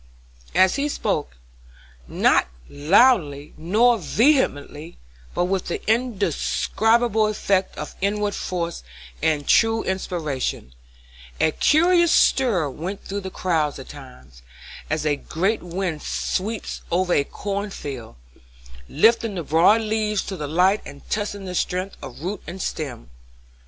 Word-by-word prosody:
As 185 +6 +4
he 290 +1 0
spoke, - - -2 0.7
not - - +3 0.2
loudly 150 - +3
nor 220 +8 +3
vehemently, 170 - +1 0.4
but 175 - +1
with 185 0 -1
the 175 - -2
indescribable 225 0 +1
effect 200 -3 0
of - - -6
inward 205 +1 0
force 170 -3 -3 0.4
and 155 -2 +1
true 225 0 +4
inspiration, 155 - -3 0.7
a 160 - +3
curious 340 - +4
stir 220 - +3
went 175 +8 -6
through 200 +1 -4
the 190 - -6
crowd 160 -6 -1
at 135 - -10
times, 65 - -13 0.5
as 155 0 -1
a 145 -1 +1
great 190 +10 -1
wind 175 -3 -3
sweeps 210 +4 -3
over 180 +1 +1
a 140 - +3
corn 200 +6 -4
field, 130 - -7 0.7
lifting 225 - +3
the 175 - -3
broad 170 +9 +4
leaves 215 -1 -1
to 195 - -5
the 150 -5 -5
light 180 +7 +3
and 140 - -12
testing 205 -2 -2
the 180 - -5
strength 185 +2 -2
of 130 0 -9
root 195 +4 -3
and 185 +3 -7
stem. 135 - -5
185 Hz, 130 wpm, -23 LUFS, 155-215 Hz, 0.7 s, As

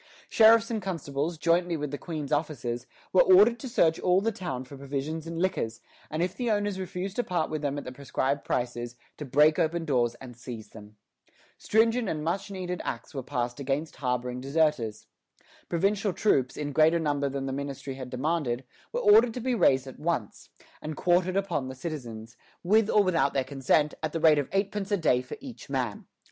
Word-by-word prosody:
Sheriffs 225 +1 +6
and 220 -2 -1
constables, 165 -3 -3
jointly 170 +1 +2
with 150 -2 -4
the 145 - -3
Queen's 155 -5 -5
officers, 135 -6 -2 0.3
were 185 - +7
ordered 210 +6 +6
to 260 - -6
search 165 -9 +3
all 180 0 +3
the 225 +3 0
town 155 - -5
for 130 +2 -11
provisions 140 +4 -4
and 165 0 -5
liquors, 165 -11 -1 0.3
and 155 +3 -1
if 180 +1 -2
the 245 -2 -2
owners 205 -2 0
refused 185 +1 -5
to 245 - +2
part 175 -6 -1
with 155 -1 -2
them 145 -1 -2
at 145 - -4
the 125 - -7
prescribed 140 +1 -2
prices, 120 -1 -2 0.2
to 150 - -6
break 150 +5 +4
open 165 0 0
doors 120 -5 +1
and 125 -1 -11
seize 120 -2 -8
them. 105 -1 -13 0.6
Stringent 225 0 +2
and 155 -1 -3
much 180 +6 -2
needed 180 -2 -4
Acts 115 - -5
were 135 - -3
passed 120 0 -3
against 140 +3 -2
harboring 125 -1 -2
deserters. 140 -6 0 0.6
Provincial 195 +3 +1
troops, 135 - +1
in 145 -1 -3
greater 160 +4 +4
number 145 -3 0
than 135 0 -3
the 135 - -3
ministry 140 0 -5
had 130 -1 -7
demanded, 135 -1 -1 0.3
were - - -2
ordered 415 - +6
to - - -3
be 255 +1 -1
raised 135 - +3
at 130 - -10
once, 150 -10 -3 0.3
and 155 -1 -5
quartered 180 +1 +2
upon 170 -9 -1
the 130 - -7
citizens, 120 -7 -7 0.3
with 215 +4 +3
or 210 - +5
without 170 -7 +1
their 135 - +2
consent, 140 +3 +1
at 155 -1 -3
the 165 - -1
rate 155 -2 +5
of 145 - -3
eightpence 195 +1 -1
a 205 - +3
day 135 -8 +2
for 130 - -8
each 255 - -10
man. 125 -6 -3
155 Hz, 195 wpm, -28 LUFS, 130-185 Hz, 0.6 s, were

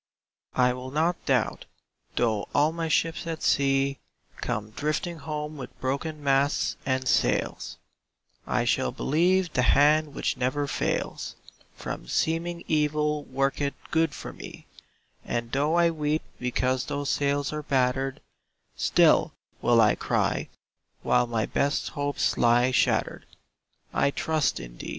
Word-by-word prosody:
I 125 0 +3
will 125 +1 -7
not 160 +5 0
doubt, - - +1 0.5
though 110 -4 0
all 150 +2 +4
my 165 0 -3
ships 165 +1 0
at 165 -1 -4
sea 135 -1 +2 0.4
Come 105 0 -3
drifting 155 +6 -2
home 150 0 -5
with 130 -3 -9
broken 145 +3 -3
masts 140 +1 +2
and 130 -1 0
sails; - - 0 0.7
I - - +1
shall 65 - +1
believe 175 +3 +1
the 125 - +2
Hand 145 +3 +4
which - - -1
never 130 +3 0
fails, 140 - -2 0.4
From - - -6
seeming 170 - -1
evil 150 -1 +1
worketh 135 +2 -1 0.2
good 160 -2 +1
for - - -7
me; - - -10 0.6
And 120 0 -3
though 145 +4 +1
I 170 -1 +4
weep 155 -1 -1 0.2
because 125 +1 0
those 145 -1 -2
sails 140 0 0
are 150 - -3
battered, 135 -1 0 0.5
Still - - +4 0.3
will 120 -1 +4
I 105 -2 +5
cry, - - -1 0.5
while 125 0 +3
my 115 -2 0
best 140 0 0
hopes 145 0 -1
lie 120 +2 +4
shattered, 125 - +1 0.7
"I - - +3
trust 155 +1 0
in - - -10
thee." - - -6
140 Hz, 135 wpm, -26 LUFS, 130-155 Hz, 0.7 s, I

